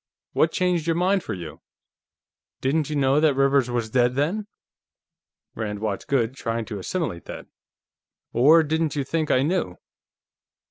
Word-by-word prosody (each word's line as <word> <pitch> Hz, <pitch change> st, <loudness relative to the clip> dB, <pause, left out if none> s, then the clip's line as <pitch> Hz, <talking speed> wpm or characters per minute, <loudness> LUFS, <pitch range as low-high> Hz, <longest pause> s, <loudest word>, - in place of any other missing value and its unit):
What 160 Hz, -, +3 dB
changed 180 Hz, -3 st, 0 dB
your 165 Hz, -, +2 dB
mind 185 Hz, +2 st, +1 dB
for -, -, -4 dB
you? 85 Hz, -4 st, -9 dB, 1.0 s
Didn't 150 Hz, +3 st, 0 dB
you 150 Hz, -, -2 dB
know 135 Hz, 0 st, +3 dB
that 150 Hz, -3 st, +3 dB
Rivers 135 Hz, -2 st, +3 dB
was 120 Hz, -2 st, -2 dB
dead, 125 Hz, 0 st, +2 dB
then?" 180 Hz, +10 st, -1 dB, 1.1 s
Rand 105 Hz, -2 st, -4 dB
watched 105 Hz, -2 st, -4 dB
Goode 130 Hz, -2 st, 0 dB
trying 115 Hz, -3 st, -3 dB
to 105 Hz, -3 st, -6 dB
assimilate 125 Hz, -, -3 dB
that. -, -, -8 dB, 0.9 s
"Or 155 Hz, +7 st, +6 dB
didn't 160 Hz, 0 st, -1 dB
you 145 Hz, -, 0 dB
think 155 Hz, +3 st, -2 dB
I 130 Hz, -, +3 dB
knew?" 150 Hz, -, -1 dB
140 Hz, 150 wpm, -24 LUFS, 115-160 Hz, 1.1 s, Or